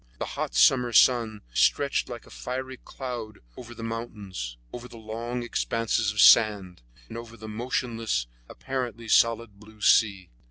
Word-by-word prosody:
The - - -3
hot - - -5
summer 120 - +4
sun 115 -4 +4
stretched 140 - +2
like 120 -1 -8
a - - -17
fiery 130 +1 -5
cloth 120 -6 -7 0.2
over 120 -1 -10
the 115 - -8
mountains, 105 - -6 0.2
over 125 0 -7
the 120 - -13
long 115 +2 -5
expanses 115 -2 -1
of 105 - -6
sand, 100 - +5 0.3
and - - -10
over 115 0 -11
the 110 0 -10
motionless, 115 - -2 0.2
apparently 120 -3 -5
solid 115 -2 +2
blue 110 0 -17
sea. 100 - +3
115 Hz, 150 wpm, -26 LUFS, 105-120 Hz, 0.3 s, sand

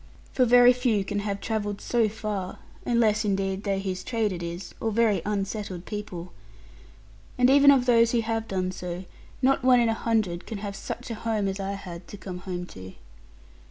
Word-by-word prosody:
For 255 - +4
very 245 +1 +7
few 240 -6 +1
can 205 +1 -2
have 200 -1 -3
travelled 205 -2 -2
so 230 -3 +1
far, 205 -3 -4 0.3
unless 225 -3 +3
indeed 195 -1 -1
they 195 -2 0
whose 190 -1 -4
trade 225 -4 0
it 175 -2 -5
is, 170 +2 -6
or 225 - 0
very 215 -4 +2
unsettled 200 -3 -3
people. 185 -5 -6 1.0
And 250 +1 +5
even 280 +1 +7
of 270 -3 +5
those 235 -2 +5
who 235 - +2
have 225 0 -2
done 185 -2 -1
so, 180 0 -6 0.4
not 270 0 +3
one 255 -1 +6
in 235 -1 +3
a - - +2
hundred 215 -7 -1
can 220 - -4
have 200 0 -5
such 245 +4 -6
a - - -1
home 220 -2 -1
as 195 +1 -3
I 195 0 -2
had 175 -3 -8
to 205 - -9
come 185 -2 -7
home 180 -1 -5
to. 95 0 -10
205 Hz, 195 wpm, -26 LUFS, 190-230 Hz, 1.0 s, very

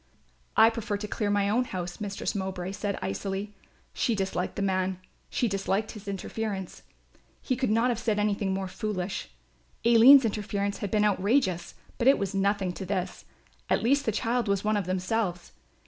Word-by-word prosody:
"I 225 +1 +7
prefer 225 -2 -3
to 210 +1 -5
clear 210 0 -2
my 205 -1 +2
own 240 +5 +2
house," 180 -1 -5
Mistress 200 -1 -3
Mowbray 190 -2 -3
said 200 0 -3
icily. 195 - -3 0.4
She 235 - 0
disliked 190 -2 -2
the 200 - -2
man, 185 -1 0 0.3
she 245 - 0
disliked 195 +1 -1
his 210 -2 -11
interference. 200 -1 -4 0.6
He 255 - -1
could 255 -1 -1
not 230 +3 +3
have 235 -2 -1
said 225 -3 0
anything 205 -1 0
more 190 0 -2
foolish. 195 - -4 0.6
Aline's 240 +3 +8
interference 205 -2 -2
had 205 - -3
been 210 0 +2
outrageous, 195 -3 +1 0.2
but 240 - +2
it 275 - +7
was 200 -1 -2
nothing 195 -1 +1
to 190 - -6
this; 190 -1 -3 0.4
at - - +2
least 280 +4 +3
the - - +3
child 230 +2 0
was 200 -1 +1
one 215 0 +1
of 200 -4 -1
themselves. 185 0 -1
205 Hz, 175 wpm, -28 LUFS, 190-225 Hz, 0.6 s, Aline's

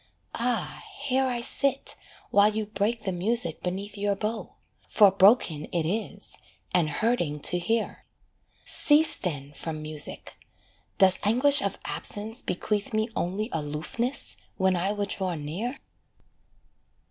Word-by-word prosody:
Ah, 235 -4 -1 0.2
here 265 -1 +1
I 245 -2 -2
sit 270 +3 +4 0.4
while 205 +1 +5
you 215 0 -2
break 210 +3 -2
the 190 - -2
music 185 -1 0
beneath 195 +3 -4
Your 205 0 -1
bow; 215 +3 -4 0.3
for 205 -3 +5
broken 190 - +4
it 170 -3 -2
is, 215 +6 -3 0.3
and 170 -4 +2
hurting 170 -4 0
to 180 - +3
hear: 225 +5 -2 0.6
Cease 305 +2 +5
then 145 -5 -5
from 155 +1 -6
music 155 -1 -3 0.6
does 190 -1 +6
anguish 260 +7 +5
of 200 - -2
absence 220 +4 -5
bequeath 205 +4 -3
Me 220 +1 0
only 200 +6 -2
aloofness 160 - -3 0.2
when 190 -1 +2
I 185 +3 0
would 205 -1 -3
draw 185 -3 -2
near? 175 - -4
205 Hz, 130 wpm, -26 LUFS, 175-230 Hz, 0.6 s, does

